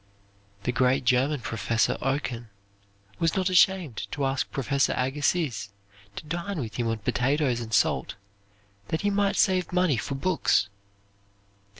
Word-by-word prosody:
The 125 - 0
great 130 +1 +2
German 130 +3 +2
Professor 115 0 0
Oken 125 -4 -2 0.7
was 165 -1 +1
not 190 -1 +1
ashamed 180 - +3
to 140 -2 -1
ask 135 +1 -1
Professor 140 +1 0
Agassiz 135 - 0 0.5
to - - -7
dine 175 +4 -4
with 110 -6 -5
him 120 -2 -1
on 115 0 -1
potatoes 125 +3 0
and 115 -1 -7
salt, 105 - +1 0.7
that 160 - -2
he 205 - +1
might 200 0 +1
save 185 -4 +2
money 180 -7 +2
for 135 +6 -3
books. 140 - +1
140 Hz, 135 wpm, -26 LUFS, 120-170 Hz, 0.7 s, ashamed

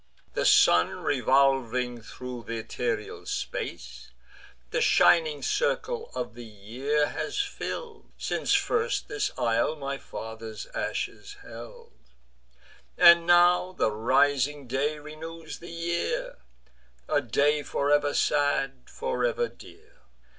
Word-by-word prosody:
The - - +1
sun, 85 - +5
revolving 130 -3 +2
thro' 125 +2 -8
th' - - -17
ethereal 235 - -4
space, 410 0 -5 0.6
The - - 0
shining 470 -1 +4
circle 485 -1 -1
of - - -4
the 120 +1 -10
year 120 +8 -2
has 420 - -4
fill'd, 440 +3 -5
Since - - 0
first 460 +2 0
this 420 0 -1
isle 115 +6 +1
my 140 -2 -4
father's 110 -1 -8
ashes 410 0 -4
held: 470 -2 -11 1.0
And 170 0 +7
now 175 +1 +5
the 110 - +1
rising 140 +5 +2
day 140 +5 -1
renews 160 +2 -9
the 170 - -10
year; 170 +1 -3 0.7
A - - +2
day 150 +1 +2
for 145 0 -1
ever 145 0 +2
sad, 140 -3 0
for 480 +1 -3
ever 480 -1 +1
dear. 435 +4 -17
150 Hz, 115 wpm, -27 LUFS, -, 1.0 s, And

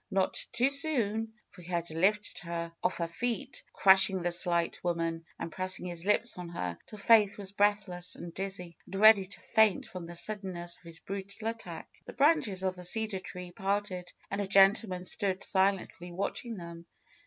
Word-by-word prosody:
Not 190 -2 +1
too 245 +3 +2
soon, 225 -7 +1 0.2
for 180 - -14
he 170 - -13
had 170 -2 -2
lifted 200 +6 +1
her 170 -1 -5
off 180 - 0
her 170 - -1
feet, 245 +9 -3
crush 190 0 +6
ing 190 -2 -3
the 175 - 0
slight 170 -1 0
woman, 165 -1 -1
and 165 - -5
pressing 185 +2 0
his 175 -1 -3
lips 210 0 +1
on 175 -1 -6
hers 90 - -4
till 215 - -10
Faith 210 -1 +5
was 195 -2 -6
breathless 200 -3 0
and 170 -1 -8
dizzy, 185 -4 -5
and - - -8
ready 215 -2 +7
to 200 - -7
faint 220 -3 +3
from 180 -2 -8
the 175 +1 -9
suddenness 180 -3 -2
of - - -28
his 165 0 -6
brutal 200 +3 -6
attack. 180 -8 -8
The - - -9
branches 275 - +3
of 185 -1 0
the 180 - -10
cedar 215 +2 0
trees 180 -1 -9
parted 195 -2 -2 0.2
and 200 +1 -1
a 200 - -2
gen 195 0 +7
tleman 185 -5 -4
stood 190 0 0
silently 190 -2 +1
watching 200 +5 -4
them. 170 -1 -9
190 Hz, 190 wpm, -30 LUFS, 175-210 Hz, 0.2 s, ready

